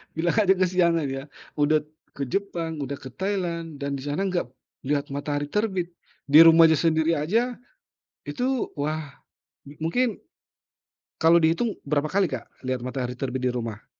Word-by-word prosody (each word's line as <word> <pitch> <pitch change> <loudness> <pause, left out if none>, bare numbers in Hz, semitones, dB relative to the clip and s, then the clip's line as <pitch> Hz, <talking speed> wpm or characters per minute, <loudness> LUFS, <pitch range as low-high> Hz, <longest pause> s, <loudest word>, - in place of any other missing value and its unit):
Bilang 170 +6 0
aja 190 -1 +5
kesiangan 175 -4 +2
ya. 135 0 -4 0.4
Udah 150 +1 +3 0.3
ke 140 - -4
Jepang, 170 -4 -3
udah 140 +1 -5
ke 130 - -9
Thailand, 170 -5 -3
dan 140 0 -2
di 135 - -8
sana 150 +7 -1
nggak 180 -7 -1 0.4
lihat 145 0 -1
matahari 145 +1 -3
terbit, 190 -4 -1 0.4
di 150 +3 +8
rumahnya 165 -1 +7
sendiri 165 0 +2
aja 230 +11 0 0.7
itu 255 -1 -1
wah, 150 -1 -3 0.7
mungkin 240 +8 0 1.0
kalau 165 +1 +5
dihitung 170 +8 +2
berapa 145 +1 0
kali, 195 -2 +2
Kak, 130 -3 -4 0.2
lihat 130 -1 -2
matahari 125 -1 -4
terbit 130 -1 -3
di - - +1
rumah? 115 -3 -5
160 Hz, 145 wpm, -25 LUFS, 140-185 Hz, 1.0 s, di